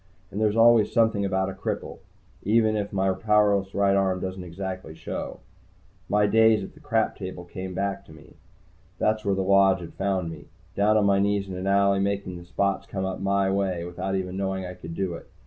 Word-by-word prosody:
And 100 - -3
there's 105 -1 +2
always 115 -1 +5
something 110 -3 +2
about 95 0 0
a - - -8
cripple, 95 - -5 0.4
even 110 +1 +2
if 105 -1 -2
my 95 -1 +1
powerless 105 -2 +2
right 100 -1 +3
arm 95 -1 +1
doesn't 95 0 -5
exactly 90 -2 -6
show. 80 - -6 0.7
My 105 0 +3
days 110 0 +4
on - - -8
the - - -17
Crap 110 -1 0
Patrol 95 -2 -7
came 95 +1 -7
back 100 +1 -2
to - - -16
me. 80 -1 -15 0.6
That's 110 0 +1
where 100 -1 +1
the 95 - 0
Lodge 95 0 +4
had 85 - -9
found 95 -3 -1
me, 80 - -11 0.3
down 105 +3 +3
on 105 - +3
my 100 -1 +3
knees 100 0 +1
in 95 - -6
an 90 +1 -4
alley, 100 0 +3
making 100 -2 -2
the 85 - -12
spots 100 +2 -1
come 95 -1 -3
up 95 0 -3
my 100 0 +1
way 95 -3 -1
without 90 +2 -3
even 95 -1 -3
knowing 95 -1 -2
I 90 - -6
could 85 -2 -9
do 95 -2 -2
it. - - -10
95 Hz, 210 wpm, -25 LUFS, 95-100 Hz, 0.7 s, always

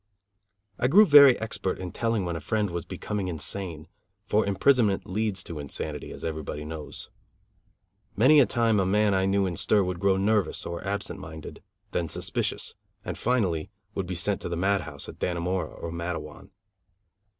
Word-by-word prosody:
I 125 - +3
grew 200 +11 +7
very 140 -6 +8
expert 110 -4 -3
in 90 -1 -6
telling 115 -4 -1
when 85 -1 -2
a - - -3
friend 105 +4 -1
was 85 -1 -4
becoming 105 -3 -4
insane; 85 -1 -4 0.4
for 105 +1 +2
imprisonment 105 0 +3
leads 100 -1 -2
to 80 -3 -7
insanity, 75 +1 -5
as - - -7
everybody 75 -2 -4
knows. 75 -1 -8 1.0
Many 140 +8 +6
a 135 - +6
time 115 -3 +2
a 95 - +2
man 105 +1 +3
I 95 0 +2
knew 100 0 +2
in 90 -2 -2
stir 105 -2 +3
would 90 -1 -3
grow 95 0 +3
nervous 105 +1 +1
or 85 0 -5
absent 100 +1 -3
minded, 80 -1 -9 0.3
then 85 -2 -1
suspicious, - - -2 0.3
and - - -3
finally 95 -11 0 0.2
would 95 -3 -3
be 90 - -3
sent 100 +3 0
to - - -4
the 85 - -2
madhouse 90 -6 -1
at - - -10
Dannemora 90 -1 -1
or 85 - -7
Matteawan. 85 0 -5
95 Hz, 170 wpm, -27 LUFS, 85-105 Hz, 1.0 s, very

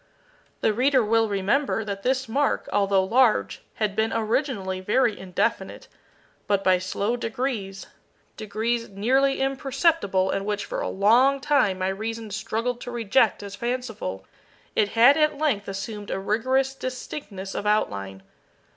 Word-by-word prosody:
The 215 - +2
reader 260 +2 +3
will 225 +1 +2
remember 210 +4 0
that 200 -1 -4
this 260 +3 0
mark, 280 +5 0
although 195 -1 +3
large, 235 +3 +2
had 210 -2 -1
been 220 +1 +1
originally 220 -4 -1
very 215 +4 +1
indefinite, 185 -2 -2 0.6
but 200 -1 +1
by 185 -1 +4
slow 200 +5 -1
degrees 225 -5 -4 0.5
degrees 225 +2 -2
nearly 260 +8 +1
imperceptible, 270 - +1
and 195 - -2
which 205 0 -2
for - - -4
a - - -2
long 245 +8 +4
time 265 -9 +2
my 185 0 -1
reason 220 +2 -5
struggled 230 +3 -3
to - - -6
reject 230 -2 +1
as 200 -1 -8
fanciful 230 - -4 0.5
it 210 -1 +2
had 260 +6 +7
at 305 -1 +2
length 280 -10 0
assumed 200 +1 -6
a - - -2
rigorous 260 +7 0
distinctness 250 -7 -6
of 210 - -3
outline. 100 - -1
220 Hz, 140 wpm, -25 LUFS, 195-255 Hz, 0.6 s, had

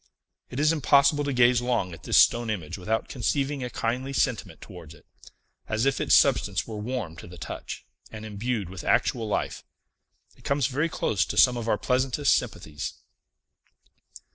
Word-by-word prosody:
It 125 - -5
is 155 +2 +4
impossible 145 -1 +4
to 140 - -1
gaze 125 -1 +4
long 120 -8 -1
at 80 - -11
this - - +1
stone 120 -1 +4
image 90 -8 -4
without 110 +4 -2
conceiving 135 +2 -1
a 125 - -3
kindly 125 +4 -3
sentiment 125 -3 -1
towards 85 -6 -12
it, - - -21 0.6
as 110 +3 0
if 135 0 +1
its - - +4
substance 105 -8 +3
were 110 -2 -7
warm 105 -7 -4
to - - -10
the 90 +1 -12
touch, 80 - -7 0.3
and 110 0 -8
imbued 110 0 -3
with 90 -1 -8
actual 115 -3 +1
life. 105 - -2 0.7
It - - -22
comes 140 -2 +1
very 145 +6 0
close 105 -9 0
to - - -5
some 125 -1 +6
of 120 -1 -4
our 105 - +2
pleasantest 130 +4 +1
sympathies. 75 -1 -3
120 Hz, 170 wpm, -26 LUFS, 105-135 Hz, 0.7 s, some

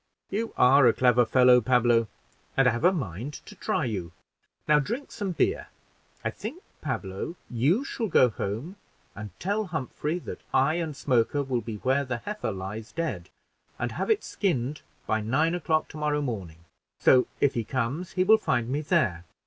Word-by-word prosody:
"You 225 +3 -2
are 130 +1 +6
a 115 - +5
clever 125 -2 +4
fellow, 125 0 +6
Pablo, 120 -1 +3 0.5
and 135 -1 +5
I - - +5
have 120 +5 -3
a 180 - +6
mind 130 - -4
to - - -11
try - - -1
you. 95 -8 -4 0.5
Now 150 0 +5
drink 235 - -4
some 200 -3 -3
beer. 400 - 0 0.6
I - - +1
think, 280 - -7 0.2
Pablo, 120 - -4 0.2
you 145 - +2
shall 235 -4 -3
go 130 -8 +5
home, 115 - -5 0.4
and 105 +1 -7
tell 205 +3 -1
Humphrey 155 -1 -3
that 180 - -8
I 135 +4 +4
and 160 -4 -3
Smoker 130 +1 +1
will 130 -3 -1
be 115 -1 -6
where 130 +6 +1
the 125 -3 -3
heifer 210 - -4
lies 100 +3 -6
dead, 165 0 -3 0.5
and - - -2
have - - -3
it 440 -2 +2
skinned 150 - -1 0.2
by 110 0 0
nine 140 +10 +1
o'clock 160 -2 0
tomorrow 150 -1 -1
morning; 90 - -5 0.3
so, 125 -1 +5
if 140 - +3
he 115 - -1
comes, 130 - -3
he 185 - +2
will 220 +3 +6
find 120 -1 0
me 145 +3 -1
there." 145 - +1
135 Hz, 175 wpm, -27 LUFS, 115-165 Hz, 0.6 s, are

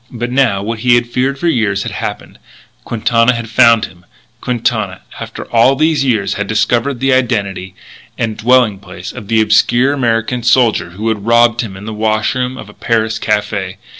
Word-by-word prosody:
But 120 0 -5
now, 125 -7 +1
what 115 +1 -4
he 120 +1 +3
had 120 0 +2
feared 130 +3 -1
for 170 - -2
years 110 - 0
had - - -5
happened. - - -6 0.5
Quintana 115 +1 +1
had 115 -1 -6
found 115 -3 +5
him, 85 +1 -16 0.4
Quintana, 110 -6 -2 0.2
after - - -7
all 120 +4 +4
these 155 0 +1
years, 115 -7 0
had 105 0 -4
discovered 120 +5 0
the 135 +1 +2
identity 100 -7 -1 0.4
and 110 -2 -2
dwelling 115 -2 +2
place 90 -2 -9
of 100 - -10
the 110 0 +2
obscure 120 +5 +3
American 120 -2 -1
soldier 120 -6 +2
who 110 +2 -3
had 105 -1 -3
robbed 115 0 +4
him 100 -5 -7
in 100 - -10
the 110 - -5
wash 110 0 0
room 130 0 -3
of - - -9
a 105 - -14
Paris 110 -1 -1
café. 100 -3 -2
115 Hz, 185 wpm, -14 LUFS, 105-125 Hz, 0.5 s, found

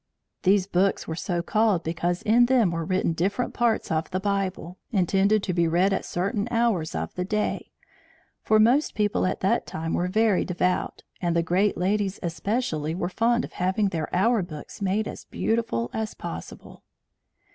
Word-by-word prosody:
These 190 0 +3
books 195 0 +1
were 160 - -3
so 175 0 -2
called 210 -2 +2
because 170 +2 -2
in 240 +3 +4
them 240 -8 +3
were 165 -1 -2
written 185 -2 0
different 200 +9 -1
parts 235 -6 0
of 160 0 -1
the 185 - -2
Bible, 190 -3 -2
intended 195 +1 +2
to 180 - -1
be 170 -1 +2
read 180 +4 +2
at - - -2
certain 200 +4 -1
hours 230 -9 0
of - - -3
the 180 - -2
day; 210 +3 -2 0.7
for 215 - +3
most 245 +8 +3
people 205 -3 +1
at 185 - -3
that 190 - +1
time 160 +1 -4
were 180 - 0
very 215 +1 +2
devout, 180 0 -1 0.2
and 170 -2 0
the 170 - +2
great 190 +5 +1
ladies 195 +1 0
especially 165 -2 -2
were 175 -1 -2
very - - -22
fond 235 +1 +2
of - - -13
having 190 +3 +1
their 160 -4 -3
hour 220 +5 +3
books 165 +1 -9
made 200 +2 0
as - - -8
beautiful 220 - -1
as 220 -1 -3
possible. - - -8
190 Hz, 180 wpm, -25 LUFS, 175-215 Hz, 0.7 s, in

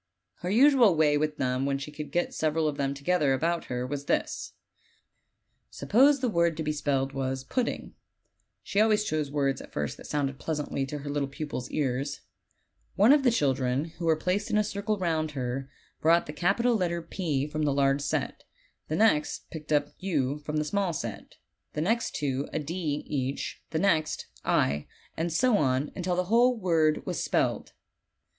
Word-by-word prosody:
Her 180 - -4
usual 245 - +6
way 155 -2 +4
with 150 0 0
them 130 +1 0
when 140 0 0
she 140 +2 -7
could 150 0 -7
get 175 - 0
several 155 0 +1
of 150 - -1
them 140 0 -1
together 145 -1 +1
about 165 +5 0
her 125 0 -3
was 140 +2 -4
this: - - -1 1.2
Suppose 275 +5 +3
the 255 - +1
word 170 -6 +1
to 160 - -2
be 150 - 0
spelled 140 -2 -1
was 130 -1 -2
"Pudding" 240 - -2 0.7
(she 200 - +1
always 215 -1 +3
chose 155 -7 -1
words 140 -1 0
at - - -12
first 75 -1 -3
that - - -11
sounded 140 -2 -2
pleasantly 150 -3 -2
to 150 - -4
her 145 0 -6
little 145 -1 -1
pupils' 135 -3 -5
ears), 140 0 -2 0.7
one 215 +8 +6
of 295 - +4
the 265 - +4
children, 135 - +1
who 170 - -3
were 160 -1 +4
placed 185 +7 -1
in 215 - +2
a 210 - +4
circle 205 +1 -2
round 160 -4 -1
her, 130 +2 -3 0.3
brought 165 +2 +4
the 150 - -7
capital 200 +9 +2
letter 170 -4 -1
"P" 160 -5 -2
from 150 +1 -4
the 150 -2 +2
large 140 0 +2
set; - - -2 0.4
the 155 - -2
next 160 -6 +1
picked 155 -1 -8
up 145 -1 +2
"u" 150 -7 -1
from 150 +1 -4
the 150 - 0
small 195 +1 0
set; 115 -8 -6 0.4
the 150 - -2
next 225 +8 0
two 140 -2 -2
a - - -2
"d" 155 -1 -3
each; 135 -1 -3
the 160 - -2
next 160 -4 +1 0.2
"i," 70 +1 +1 0.3
and 165 +1 -2
so 225 +5 +3
on, 130 +1 +1
until 180 -1 -1
the 180 - +1
whole 240 +6 +3
word 165 -6 +2
was - - -2
spelled. - - 0
155 Hz, 185 wpm, -28 LUFS, 140-180 Hz, 1.2 s, usual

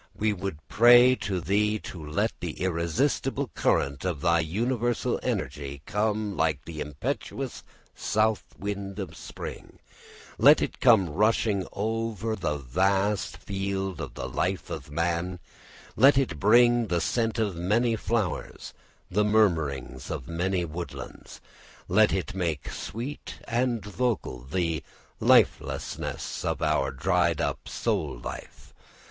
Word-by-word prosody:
We 105 0 +1
would 95 -4 -4
pray 120 +2 +7
to 95 -2 -2
thee 105 +5 +1
to 85 -4 -8
let 75 0 0
the - - -4
irresistible 100 - -1
current 70 0 +1
of 90 -6 -2
thy 85 0 +3
universal 115 +8 0
energy 70 -1 -3
come 105 -1 -1
like 80 -3 0
the 80 -2 -6
impetuous 75 -1 -4 0.3
south 110 0 +1
wind 100 -1 -4
of 95 -3 -5
spring, - - -8 0.6
let - - +8
it - - -3
come 110 -8 +5
rushing 105 +1 +2
over 110 0 -2
the 75 -7 -2
vast 95 +7 0
field 95 -2 -3
of - - -7
the - - -4
life 95 -1 -2
of 80 -4 -6
man, 85 +3 -1 0.6
let 135 +1 +6
it 120 - 0
bring 120 +3 +5
the 85 -3 +1
scent 115 +7 0
of 105 -5 0
many 110 +7 +1
flowers, 110 -4 -2 0.4
the 105 +3 +3
murmurings 80 - +1
of 75 -5 -5
many 90 +2 -1
woodlands, 85 +2 -8 0.5
let - - +4
it - - -2
make 85 -6 -2
sweet 125 +7 -6
and 120 -3 0
vocal 105 - -2
the 80 +4 -1 0.4
lifelessness - - +1
of - - -1
our - - +2
dried 85 +3 +1
up - - -2
soul - - -1
life. - - -9
95 Hz, 130 wpm, -27 LUFS, 85-110 Hz, 0.6 s, let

